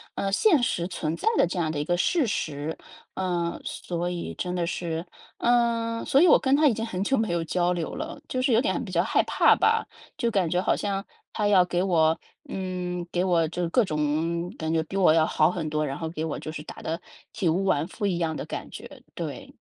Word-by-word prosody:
呃， 195 0 -1
现 320 - +4
实 175 -7 0
存 165 -3 -3
在 - - -5
的 - - +5
这 180 +1 -3
样 160 -2 0
的 150 - -3
一 145 - -2
个 175 - +1
事 295 - +2
实。 155 -6 -3 0.4
呃， 175 -2 -2
所 175 0 -3
以 175 -1 -4
真 180 0 -3
的 175 - 0
是， 170 0 -3 0.3
呃， 235 -1 +1
所 275 - +4
以 - - +6
我 - - +7
跟 270 0 +3
她 305 +1 +5
已 260 - +4
经 225 - -3
很 195 -5 -2
久 270 - +2
没 220 -2 0
有 170 -1 0
交 175 +2 +1
流 170 -3 -2
了， 320 -1 -5
就 255 - -2
是 255 - +2
有 225 - +5
点 280 +1 0
比 200 - -7
较 170 -1 +2
害 - - +2
怕 - - +4
吧。 - - +2 0.3
就 235 -1 0
感 185 -6 +1
觉 180 - +1
好 185 - +2
像 195 -1 -2 0.3
她 210 -2 0
要 195 -3 +6
给 175 0 -1
我 160 -4 +3 0.3
嗯， 180 -2 -3
给 180 - +1
我 170 -3 +2
就 175 0 -2
各 235 +6 +3
种 160 +2 -1
感 160 0 -2
觉 160 - +2
比 190 +5 -5
我 180 -5 +5
要 160 -1 +4
好 155 +1 +3
很 165 -4 -3
多， 155 0 0
然 135 -1 -3
后 160 - -3
给 160 -1 -4
我 155 - -3
就 155 - -6
是 150 -1 -7
打 - - -10
得 165 +2 -3 0.3
体 185 - -1
无 170 +4 +2
完 160 -4 +1
肤 205 +2 -3
一 180 -3 0
样 165 -2 -1
的 - - -4
感 - - -6
觉。 - - -11
对。 - - -6
180 Hz, 255 characters per minute, -26 LUFS, 165-205 Hz, 0.4 s, 我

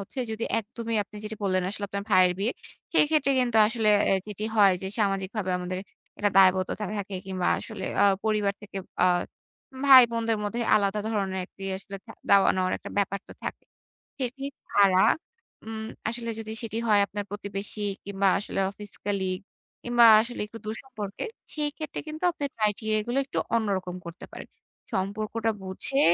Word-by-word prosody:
হচ্ছে, 200 +7 -9
যদি 220 +1 -3
একদমই 230 +1 -4
আপনি 210 +1 -14
যেটি 215 +1 -5
বললেন, 185 -1 +2
আসলে 205 0 -3
আপনার 200 0 -4
ভাইয়ের 185 -1 +6
বিয়ে। 220 +5 0 0.4
সেইক্ষেত্রে 295 -2 +4
কিন্তু 240 -3 +1
আসলে 225 -1 0 0.2
অ্যা 195 - +4
যেটি 210 0 -5
হয় 200 -2 +7
যে, - - -3
সামাজিকভাবে 195 -1 -1
আমাদের 180 +1 -4 0.4
একটা 205 -1 +2
দায়বদ্ধতা 190 +2 +4
থাকে। 200 0 -5
কিংবা 185 -2 -1
আসলে 215 -4 -6 0.2
আ - - +7 0.2
পরিবার 210 -2 +1
থেকে 200 -1 -10 0.3
আ - - +6 0.8
ভাই 265 -2 +11
বোনদের 230 -1 0
মধ্যে 235 +4 -2
আলাদা 200 0 +2
ধরনের 195 -4 -1
একটি 195 - -16
আসলে 195 +1 -8
থা 225 - -10 0.2
দেওয়া-নেওয়ার 185 -2 +4
একটা - - -9
ব্যাপার 200 0 0
তো - - -9
থাকে। - - -5 0.6
সেটি 265 +1 -3 0.2
ছাড়া 195 -2 +4 0.6
উম 220 0 -5 0.2
আসলে 235 0 -4
যদি 220 0 -6
সেটি 225 -1 -4
হয় 210 -1 +5
আপনার 205 +1 -4
প্রতিবেশী 205 +1 -4 0.2
কিংবা 200 0 0
আসলে 200 - -4
অফিস 205 0 -11
কলিগ, 190 -2 -1 0.4
কিংবা 240 -1 +5 0.2
আসলে 245 +2 -5
একটু 225 +2 -10
দূর 215 - -3
সম্পর্কে, 215 - -6 0.3
সেই 300 -1 +1
ক্ষেত্রে 310 -2 -5
কিন্তু 310 +3 -7
আপনার 285 -3 -4
criteria 215 0 +1
গুলো 245 - -1
একটু - - -6 0.2
অন্যরকম 190 -5 -1
করতে 170 +1 -8
পারেন। - - -9 0.5
সম্পর্কটা 215 +3 -1
বুঝে, 190 +8 -1
210 Hz, 165 wpm, -27 LUFS, 195-230 Hz, 0.8 s, ভাই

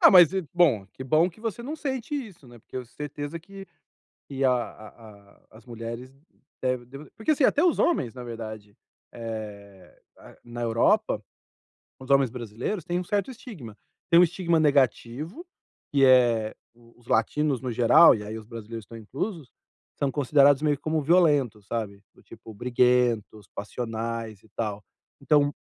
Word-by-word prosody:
Ah, - - +8
mas 180 -2 +8
e 190 -4 -2
bom, 140 - +3
que - - -8
bom 155 +7 +3
que 180 - -16
você 225 0 -4
não 280 +6 -5
sente 270 -3 -4
isso, 205 - -7
né. 120 -2 -15
Porque - - -11
eu 125 - -4
certeza 145 +5 -6
que 195 +3 -11 0.6
que 135 -1 -2
a 130 - +5
a 110 -3 -9
as 110 +2 -17
mulheres 115 +2 -7 0.5
devem 125 -1 -1
deva 135 +4 -11
porque, 225 +8 +1
assim, 295 - 0
até 295 - +4
os 350 - +3
homens, 130 - +1
na 125 - -8
verdade, 110 -3 -8 0.4
eh, 105 -4 -8 0.2
na - - -16
na 120 0 -7
Europa, 115 - +2 0.8
os 130 - -12
homens 135 -2 +4
brasileiros, 125 - -5
têm 175 +1 -1
um - - -3
certo 205 +8 -1
estigma. 170 - -10 0.4
Tem 170 - +8
um - - +8
estigma 170 -1 +1
negativo, 145 - 0 0.5
que 140 -1 +4
é 120 -4 +4 0.2
os 120 0 -23
latinos, 135 +4 +1
no 130 -2 -3
geral, 120 +8 +7
e 105 - -6
aí 105 +2 -6
os 110 - -10
brasileiros 115 -1 -8
estão 115 - -11
inclusos, 140 - -5 0.4
são 140 -1 -1
considerados 145 0 +4
meio 150 -2 +1
como 155 +1 -1
violentos, 145 - +3
sabe, 105 -4 -4
do - - -22
tipo, 110 - -13
briguentos, 120 -2 +1
passionais 115 -1 -5
e 110 - -22
tal. 105 -2 -3 0.4
Então 145 -1 +3
125 Hz, 165 wpm, -26 LUFS, 115-160 Hz, 0.8 s, Ah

